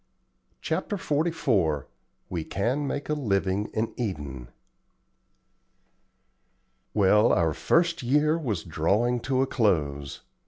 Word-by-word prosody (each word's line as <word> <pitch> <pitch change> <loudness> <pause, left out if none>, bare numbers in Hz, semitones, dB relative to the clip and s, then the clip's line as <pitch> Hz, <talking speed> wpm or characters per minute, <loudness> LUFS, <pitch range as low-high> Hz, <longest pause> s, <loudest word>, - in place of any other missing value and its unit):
CHAPTER 205 - -2
XLIV 135 - 0 0.4
WE 85 -3 -3
CAN 125 - -1
MAKE 140 +1 -3
A - - +2
LIVING 100 -7 0
IN 110 +1 -2
EDEN 75 - -4 2.5
Well, 105 +2 +5
our 80 -4 +2
first 170 - +1
year 150 +5 +2
was 115 - -2
drawing 100 +10 +1
to 130 +2 +1
a - - +1
close. 75 - 0
110 Hz, 105 wpm, -26 LUFS, 85-140 Hz, 2.5 s, Well